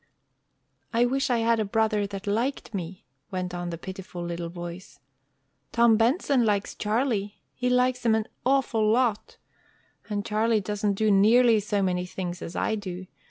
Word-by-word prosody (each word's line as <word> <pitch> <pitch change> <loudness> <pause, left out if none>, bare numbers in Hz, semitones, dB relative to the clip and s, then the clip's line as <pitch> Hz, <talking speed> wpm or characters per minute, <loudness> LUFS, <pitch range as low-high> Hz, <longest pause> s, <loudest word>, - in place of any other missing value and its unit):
"I 235 +1 +3
wish 270 +3 0
I 245 - +2
had 230 0 +3
a - - +2
brother 210 0 +1
that 195 -1 -7
liked 230 +4 -1
me." 185 -1 -6 0.2
went 185 -1 -4
on 175 0 -4
the 170 - -5
pitiful 185 0 -7
little 170 0 -4
voice. 175 +1 -8 0.7
"Tom 235 -1 +5
Benson 250 - +2
likes 205 -2 0
Charlie. 215 -2 -1
He 250 0 -1
likes 250 0 +2
him 225 -2 +4
an 220 0 -1 0.2
awful 245 -5 +2
lot. 225 -2 +1 0.7
And 205 -1 -2
Charlie 220 0 +2
doesn't 205 +1 -1
do 215 +1 +2
nearly 225 +3 +5
so 205 -1 -1
many 180 -1 -1
things 180 -1 -5
as 165 - -7
I - - 0
do. 185 -3 -5
210 Hz, 160 wpm, -26 LUFS, 190-235 Hz, 0.7 s, Tom